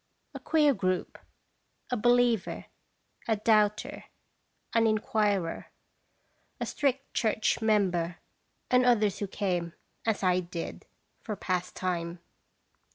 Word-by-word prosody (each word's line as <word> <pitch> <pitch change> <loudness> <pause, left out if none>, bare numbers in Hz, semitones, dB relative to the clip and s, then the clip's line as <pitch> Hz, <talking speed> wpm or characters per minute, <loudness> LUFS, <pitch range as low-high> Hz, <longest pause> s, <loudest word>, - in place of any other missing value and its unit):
A - - -6
queer 300 -3 +3
group. 185 -4 -2 0.7
A - - +2
believer, 240 -2 +2 0.6
a 220 - +3
doubter, 210 -1 +1 0.7
an 230 -1 +4
inquirer, 210 -5 0 0.9
a - - -1
strict 275 -1 -1
church 220 0 +1
member, 180 -6 +1 0.5
and 250 0 +5
others 215 -5 +3
who 205 - -2
came, 180 -4 -2 0.3
as 215 -3 +1
I 180 -1 +3
did, 170 -1 -6 0.3
for 215 - -4
pastime. 180 -2 -2
210 Hz, 100 wpm, -29 LUFS, 180-225 Hz, 0.9 s, and